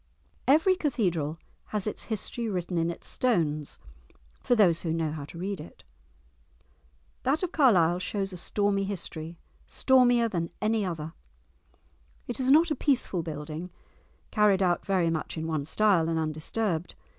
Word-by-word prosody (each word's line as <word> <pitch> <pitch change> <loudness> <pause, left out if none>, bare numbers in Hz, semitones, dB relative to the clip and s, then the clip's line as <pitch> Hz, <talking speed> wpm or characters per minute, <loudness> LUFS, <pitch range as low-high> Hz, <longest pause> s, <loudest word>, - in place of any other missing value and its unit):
Every 320 +7 +5
cathedral 180 - -1 0.3
has 210 -3 -3
its 210 - -4
history 225 +1 -3
written 180 -2 -2
in 165 +1 +1
its 170 - -7
stones, 155 - 0 0.6
for 245 - +2
those 180 -7 +4
who 165 - -2
know 160 -1 -1
how 150 -2 -5
to 170 - -11
read 195 +2 -3
it. 85 - -12 1.4
That 285 +7 0
of 360 - -1
Carlisle 180 - +4
shows 195 +1 -3
a - - -6
stormy 200 +2 0
history, 170 -4 -5 0.3
stormier 245 -3 +4
than 170 -6 -2
any 215 0 +1
other. 165 -3 -4 1.1
It 240 0 -4
is 260 0 +1
not 315 +4 +6
a - - +2
peaceful 255 - +1
building 155 +2 -6 0.6
carried 205 -3 +4
out 175 -2 +1
very 180 -4 +1
much 160 0 -3
in 160 - -3
one 155 -3 -2
style 185 -3 +3
and 165 - 0
undisturbed. 160 +3 -2
185 Hz, 150 wpm, -28 LUFS, 165-225 Hz, 1.4 s, not